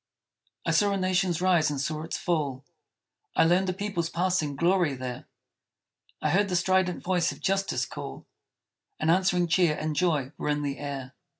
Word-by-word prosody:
I - - +1
saw 205 -1 +3
a - - 0
Nation's 185 -2 +1
rise 175 -5 +4
and 145 -2 -3
saw 155 +3 -2
its 160 - -4
fall; 145 -6 -1 0.7
I - - +5
learned 180 +3 +3
a - - 0
people's 190 -4 -2
passing 170 -5 0
glory 170 -1 +2
there; 125 -1 -6 1.0
I - - +2
heard 200 +2 +2
the 180 - 0
strident 185 0 +1
voice 175 -2 +1
of - - -10
Justice 195 0 0
call, - - -8 0.7
And 160 - +2
answering 180 0 +3
cheer 170 -2 +2
and 155 0 -2
joy 150 -6 +1
were - - -2
in 150 0 0
the 140 -1 -3
air. 140 -2 -5
170 Hz, 175 wpm, -27 LUFS, 150-185 Hz, 1.0 s, I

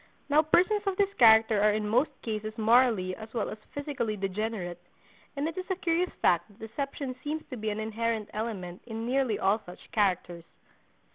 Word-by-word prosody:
Now 295 +2 +6
persons 360 +7 +3
of 385 -1 0
this 400 -1 +2
character 220 -2 +6
are 210 0 +4
in 210 0 -1
most 245 +8 +3
cases 215 -1 -4
morally 220 -5 +3
as 220 0 -10
well 225 - -1
as 215 - -8 0.2
physically 275 -7 -2
degenerate, 195 -2 -3 0.5
and 285 +2 -1
it 325 - -4
is 370 - -7
a 375 - +1
curious 350 0 0
fact 175 -1 +3
that 205 -2 -21
deception 260 +3 -5
seems 310 +1 -3
to - - -3
be 215 -2 -3
an 210 +1 -3
inherent 220 0 -2
element 200 -5 -4
in 225 0 -4
nearly 255 -3 +1
all 205 +3 +2
such 180 - -13
characters. 180 -5 0
220 Hz, 185 wpm, -29 LUFS, 210-275 Hz, 0.5 s, Now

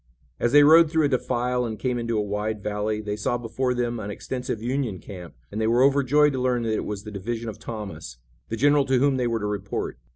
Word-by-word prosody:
As 120 - +1
they 145 +1 +7
rode 160 +2 +7
through 160 -1 +2
a - - +2
defile 125 -1 0
and 110 -2 -4
came 125 -2 -1
into 115 -1 -1
a 105 - +1
wide 105 +1 -3
valley 105 +1 -2
they 105 -1 -3
saw 105 +3 -1
before 125 +2 -2
them 120 -1 -1
an 105 -1 -5
extensive 125 +2 -4
Union 120 -3 -2
camp, 90 -3 -10 0.2
and 105 - -3
they 110 - +1
were 120 +3 +4
overjoyed 140 +2 +4
to 130 - -2
learn 125 -2 +1
that 110 -1 -1
it - - -2
was 105 -1 -5
the 105 - -8
division 115 +3 -4
of 110 0 -9
Thomas, 105 - -7 0.3
the 115 - -3
general 145 +2 +4
to 130 -1 +2
whom 135 +1 +2
they 125 -1 0
were 115 -1 -1
to - - -2
report. 100 -1 -4
120 Hz, 240 wpm, -25 LUFS, 105-130 Hz, 0.3 s, they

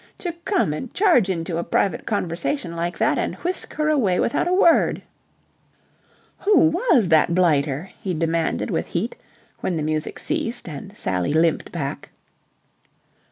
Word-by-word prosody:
To 350 - -3
come 370 - +1
and 225 +10 -6
charge 340 - +4
into 165 -2 -2
a - - -1
private 195 - 0
conversation 180 - -2
like 170 +1 -3
that - - +2
and - - -2
whisk 360 +1 -4
her 305 0 0
away 230 -13 +2
without 235 - +1
a - - 0
word... 360 -3 +4 1.4
"Who 395 -7 +4
was 325 - +2
that 160 +1 +4
blighter?" 155 -2 +1
he 185 -3 -2
demanded 165 0 -1
with - - -1
heat, 480 - -3 0.4
when 180 - -2
the 155 - -2
music 155 0 -2
ceased 235 -2 -3
and 185 +7 -8
Sally 90 +6 -1
limped 165 0 +1
back. 145 -5 -5
180 Hz, 150 wpm, -22 LUFS, -, 1.4 s, charge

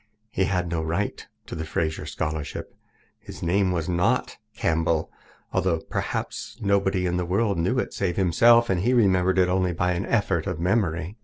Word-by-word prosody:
He 95 - +1
had 90 -2 0
no 85 -1 -2
right 85 +6 -2 0.2
to - - -9
the 80 - -4
Fraser 80 0 -2
Scholarship. 75 -2 -4 0.5
His - - -10
name 95 +2 +2
was 85 -3 -2
not 90 0 0 0.2
Campbell, 80 -1 0 0.4
although 85 -2 +1
perhaps - - -4
nobody 100 -2 +1
in 90 0 0
the 90 - 0
world 100 +1 0
knew 95 +10 +1
it 130 - -1
save 95 -3 -2
himself, 115 +6 +5
and 90 - +1
he 120 +6 +2
remembered 95 -4 +3
it 90 -1 +4
only 90 -1 +1
by 90 +2 0
an 90 +2 -2
effort 100 -7 0
of 90 -4 -3
memory. 90 0 0
90 Hz, 175 wpm, -25 LUFS, 85-100 Hz, 0.5 s, himself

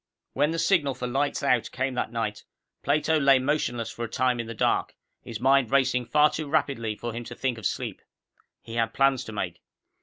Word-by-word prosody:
When 145 +2 +2
the 165 - -2
signal 155 -6 +2
for 125 - -5
lights 140 +4 -1
out 125 -4 +2
came 130 +1 -2
that 125 - -2
night, 110 -3 -3 0.4
Plato 155 +2 +2
lay 140 -2 +6
motionless 130 -4 -1
for 120 - -6
a - - -8
time 125 +1 +1
in 115 - -3
the 115 - -6
dark, - - 0 0.3
his 115 -3 -7
mind 135 -1 +3
racing 130 -2 +2
far 150 0 +4
too 155 -2 -4
rapidly 130 -8 0
for 120 +2 -5
him 120 +1 -5
to - - -8
think 125 -3 -2
of 105 - 0
sleep. - - -4 0.6
He 115 - -9
had 115 0 0
plans 135 -2 +3
to - - -7
make. 105 - -4
130 Hz, 210 wpm, -26 LUFS, 115-140 Hz, 0.6 s, lay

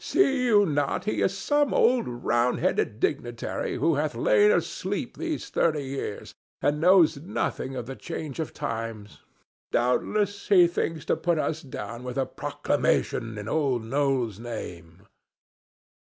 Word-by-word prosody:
"See 270 -9 +2
you 210 -4 +5
not 145 -1 -1
he 215 - -1
is 195 +1 +1
some 290 +5 +1
old 245 +1 +3
round 120 0 0
headed 105 0 0
dignitary 120 -1 -2
who 165 - +2
hath 155 -1 -2
lain 440 -4 +4
asleep 465 - -1
these 330 -3 -4
thirty 155 -3 +1
years 135 -6 -5 0.3
and 150 +1 0
knows 175 -3 +5
nothing 140 -5 -3
of 125 -2 -4
the 135 +2 -7
change 155 -3 -6
of 160 - -3
times? 110 -2 -5 0.5
Doubtless 200 - 0
he 185 -4 +7
thinks 165 -2 -2
to - - +2
put 165 +1 0
us 155 0 -1
down 120 -3 -7
with 125 0 -5
a 135 - +1
proclamation 115 -3 -1
in 105 0 -6
Old 135 -4 0
Noll's 130 -5 0
name." 90 -7 -8
145 Hz, 145 wpm, -26 LUFS, 120-185 Hz, 0.5 s, he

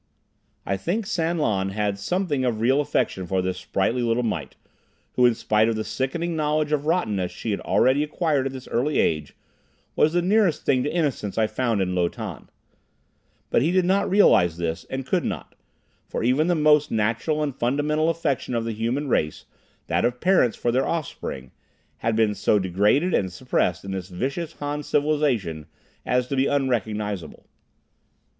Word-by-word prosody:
I 100 - -1
think 195 - -2
San 170 -4 -1
Lan 95 -10 0
held 100 0 -2
something 150 - -1
of 120 -4 0
real 130 +5 +3
affection 95 -10 -1
for 95 +2 0
this 90 0 -2
sprightly 100 +6 -1
little 120 +1 +1
mite, 115 - -3 0.6
who 125 -1 +5
in 120 - +2
spite 110 +1 +2
of 115 - 0
the 110 - -2
sickening 165 +9 -2
knowledge 150 0 0
of 150 0 0
rottenness 105 - 0
she 115 - -4
had 100 - -1
already 130 +9 +2
acquired 150 -2 0
at - - -5
this 130 -1 -9
early 135 +6 0
age, 75 -2 0 0.6
was 155 +1 +3
the 175 0 +2
nearest 195 -3 +2
thing 130 -2 +3
to 145 - -1
innocence 145 - -1
I 110 - +3
found 115 -3 0
in 90 0 -2
Lo 90 -1 +1
Tan. - - -8 1.0
But - - +3
he 155 - +2
did 185 0 +2
not 195 +2 +2
realize 90 - +4
this, 85 -1 -3
and 130 0 -4
could 180 +4 0
not; - - -5 0.5
for - - -3
even 130 +7 +2
the 175 - +2
most 150 -1 +4
natural 115 +8 0
and 140 -4 -3
fundamental 150 +6 +1
affection 140 -7 -1
of 115 -1 -1
the 115 - -2
human 120 +7 -2
race, 75 - -1 0.4
that - - 0
of 125 0 0
parents 175 - +3
for 120 - 0
their 130 +2 +1
offspring, 100 - -4 0.5
had 115 -1 -1
been 110 -2 +2
so 105 - +2
degraded 105 - +2
and 95 -2 +1
suppressed 90 -4 -1
in 95 - -5
this 95 -1 -5
vicious 140 - -3
Han 145 0 -4
civilization 140 - 0 0.4
as 125 0 +2
to 135 - -3
be 135 +1 +2
unrecognizable. 105 - -2
125 Hz, 175 wpm, -24 LUFS, 105-150 Hz, 1.0 s, who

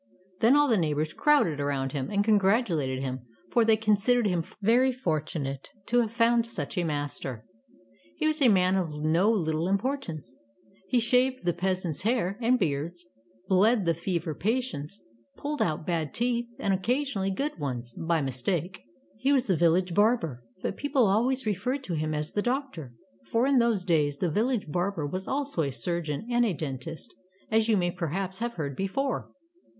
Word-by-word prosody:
Then 235 +5 +5
all 290 0 +5
the 225 -6 +3
neighbors 155 -1 -1
crowded 285 - +3
around 140 -2 -1
him, 135 -2 -3
and 205 -1 +1
congratulated 190 - +2
him, 130 -1 -3 0.3
for 235 - +4
they 220 -1 +4
con 215 -1 +2
sidered 240 +3 +2
him 175 -4 0 0.2
very 240 +5 +4
fortunate 155 - -3 0.2
to 245 +1 +2
have 225 -2 -2
found 230 0 +3
such 170 -10 -5
a 180 - 0
master. 145 -6 -4 0.7
He - - -1
was 310 -1 +1
a 265 - +6
man 185 -3 +4
of 180 -4 -1
no 155 +6 +1
little 165 -6 0
importance. 195 - -2 0.5
He 245 - +2
shaved 250 0 +1
the 175 - +2
peasants' 180 -2 -2
hair 210 -2 0
and 245 +2 +3
beards, 170 - -2 0.4
bled 200 +2 +3
the 165 - +3
fever 170 -1 -2
patients, 200 - -3 0.3
pulled 295 +1 -3
out 155 -1 0
bad 165 -4 -2
teeth, 240 0 0
and 195 - 0
occasionally 220 0 0
good 275 - -3
ones, 125 -4 -4
by 165 0 0
mistake. 165 +8 -2 0.4
He 265 +4 +2
was 265 -3 +3
the 190 - +2
village 175 +2 +2
barber, 205 - +2 0.2
but - - -2
people 275 -3 +2
always 240 +6 +1
referred 225 +7 -1
to 185 - -4
him 155 -1 -1
as 150 0 -3
the 205 - 0
doctor, 240 - -3 0.3
for 230 +2 +2
in 275 -2 +4
those 230 -6 +1
days 150 -5 +2
the 175 0 -1
village 225 - 0
barber 175 +1 -1
was 185 +6 -4
also 280 - -1
a 145 - 0
surgeon 160 - -2
and 240 0 +3
a 220 -5 +1
dentist, 155 +1 -6 0.4
as 220 +1 +3
you 215 - +4
may 175 -1 +1
perhaps 185 +4 -3
have 235 +1 -2
heard 145 - -4
before. 250 - -2
190 Hz, 175 wpm, -27 LUFS, 155-235 Hz, 0.7 s, a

